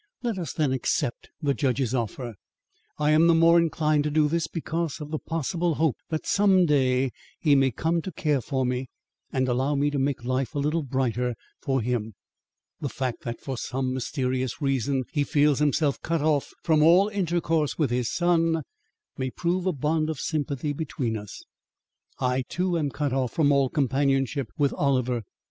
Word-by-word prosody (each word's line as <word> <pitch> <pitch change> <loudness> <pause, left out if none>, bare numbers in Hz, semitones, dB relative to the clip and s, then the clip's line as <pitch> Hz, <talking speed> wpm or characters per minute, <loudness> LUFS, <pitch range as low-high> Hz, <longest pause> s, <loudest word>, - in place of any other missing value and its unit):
Let 230 -5 -1
us 170 - -4
then 150 -5 0
accept 130 0 -1
the 140 -1 +2
judge's 130 -3 0
offer. 120 0 -3 0.6
I 150 0 +2
am 160 +2 +5
the 170 - +5
more 165 +1 +6
inclined 155 -2 +1
to - - +1
do 150 0 +3
this 165 +1 0
because 165 -1 -3
of 150 0 -7
the 155 - -2
possible 165 +1 -1
hope 155 -4 +1
that 160 -1 -3
some 195 -3 +4
day 130 -3 +2 0.3
he 150 -3 +3
may 135 -1 +4
come 165 +7 0
to 190 - -6
care 150 -4 0
for 130 +1 -1
me 125 0 -2 0.4
and 130 -1 0
allow 130 +4 +1
me 145 +1 +1
to 145 - -1
make 135 -3 -1
life 130 +4 -1
a - - -1
little 150 +4 +1
brighter 125 -3 -1 0.3
for 135 -3 0
him. 110 -3 -2 0.6
The 140 - -3
fact 130 -2 -3
that 120 -1 -5
for 130 -3 -4
some 130 0 -2
mysterious 130 0 -2
reason 135 -2 0
he 145 - +2
feels 145 -2 +2
himself 150 -1 +1
cut 165 -3 -1
off 150 -3 +1
from 155 -2 +3
all 175 +6 +6
intercourse 170 -6 0
with 150 -6 +1
his 125 -1 0
son, 165 -2 +2 0.6
may 130 0 -1
prove 175 +6 -1
a - - +3
bond 155 +1 0
of 155 -4 -3
sympathy 145 -2 -2
between 135 -6 -3
us. 105 -2 -8 0.7
I, 125 0 0
too, 180 0 0
am 150 -4 0
cut 145 -1 -2
off 130 -3 -1
from 145 -3 +3
all 140 -2 +3
companionship 135 -2 +1
with 140 -1 +2
Oliver. 125 -4 +1
145 Hz, 180 wpm, -26 LUFS, 130-160 Hz, 0.7 s, more